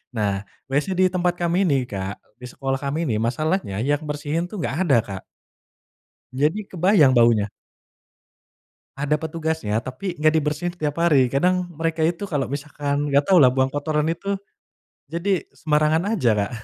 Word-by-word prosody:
Nah, 100 Hz, -2 st, -1 dB, 0.2 s
WC 145 Hz, +2 st, +1 dB
di 185 Hz, -, +6 dB
tempat 180 Hz, -1 st, +1 dB
kami 175 Hz, +3 st, +2 dB
ini 135 Hz, -4 st, +2 dB
Kak, 95 Hz, 0 st, -4 dB, 0.2 s
di 125 Hz, -, -9 dB
sekolah 135 Hz, +1 st, -3 dB
kami 145 Hz, +4 st, -1 dB
ini 115 Hz, -, 0 dB
masalahnya 155 Hz, -, -1 dB
yang 145 Hz, +3 st, 0 dB
bersihin 150 Hz, +3 st, -2 dB
tuh -, -, -8 dB
enggak -, -, -2 dB
ada, 135 Hz, -5 st, +5 dB
Kak. 95 Hz, -3 st, -8 dB, 1.1 s
Jadi, 150 Hz, +9 st, +1 dB
kebayang 180 Hz, -5 st, +4 dB
baunya. 115 Hz, -3 st, +4 dB, 1.5 s
Ada 145 Hz, +2 st, +1 dB
petugasnya, 160 Hz, -9 st, -2 dB
tapi 160 Hz, +9 st, -5 dB
enggak 155 Hz, +1 st, +3 dB
dibersihin 150 Hz, +4 st, -2 dB
tiap 150 Hz, -4 st, -3 dB
hari. 150 Hz, -7 st, +4 dB
Kadang 180 Hz, +7 st, +1 dB
mereka 165 Hz, 0 st, -2 dB
itu 170 Hz, +5 st, 0 dB
kalau 145 Hz, -8 st, -2 dB
misalkan, 145 Hz, 0 st, -2 dB
enggak 140 Hz, +1 st, +4 dB
tahu 190 Hz, -, +6 dB
lah 130 Hz, -2 st, +7 dB
buang 130 Hz, 0 st, +2 dB
kotoran 150 Hz, +2 st, -1 dB
itu, 195 Hz, +4 st, -2 dB, 0.7 s
jadi 175 Hz, +2 st, 0 dB
sembarangan 155 Hz, +1 st, +1 dB
aja, 125 Hz, -9 st, +2 dB
Kak. 100 Hz, -1 st, -1 dB
150 Hz, 155 wpm, -23 LUFS, 135-170 Hz, 1.5 s, lah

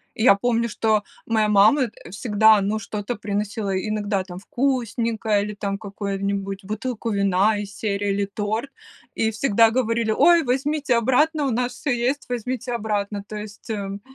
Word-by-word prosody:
И 220 Hz, -, -2 dB
я 245 Hz, -, +8 dB
помню, 235 Hz, +2 st, 0 dB
что 215 Hz, -1 st, +1 dB, 0.2 s
моя 220 Hz, -2 st, +2 dB
мама, 210 Hz, +7 st, +5 dB
э, -, -, -13 dB
всегда, 215 Hz, +2 st, +4 dB
ну, 205 Hz, +2 st, -1 dB
что-то 210 Hz, +2 st, -4 dB
приносила, 205 Hz, 0 st, -3 dB
иногда 205 Hz, -1 st, -1 dB
там 180 Hz, -1 st, -9 dB
вкусненькое, 230 Hz, -4 st, 0 dB
или 210 Hz, 0 st, -4 dB
там 200 Hz, -1 st, -3 dB
какой-нибудь 200 Hz, -1 st, -4 dB
бутылку 225 Hz, +3 st, -4 dB
вина 200 Hz, +1 st, +2 dB
из 200 Hz, -1 st, -7 dB
серии, 205 Hz, -1 st, -2 dB
или 200 Hz, 0 st, 0 dB
торт, 215 Hz, +6 st, -3 dB, 0.4 s
и 220 Hz, -, +1 dB
всегда 225 Hz, 0 st, +3 dB
говорили: 230 Hz, -1 st, 0 dB
"Ой, 340 Hz, +9 st, +5 dB
возьмите 275 Hz, +1 st, 0 dB
обратно, 285 Hz, +6 st, +2 dB
у 270 Hz, -, 0 dB
нас 245 Hz, +1 st, -1 dB
всё 290 Hz, -, -3 dB
есть, 250 Hz, +4 st, 0 dB
возьмите 250 Hz, +1 st, -3 dB
обратно!" 205 Hz, -3 st, -2 dB
То 215 Hz, -, -7 dB
есть, 210 Hz, +2 st, -9 dB
м, 200 Hz, -2 st, -4 dB
215 Hz, 160 wpm, -23 LUFS, 200-240 Hz, 0.4 s, я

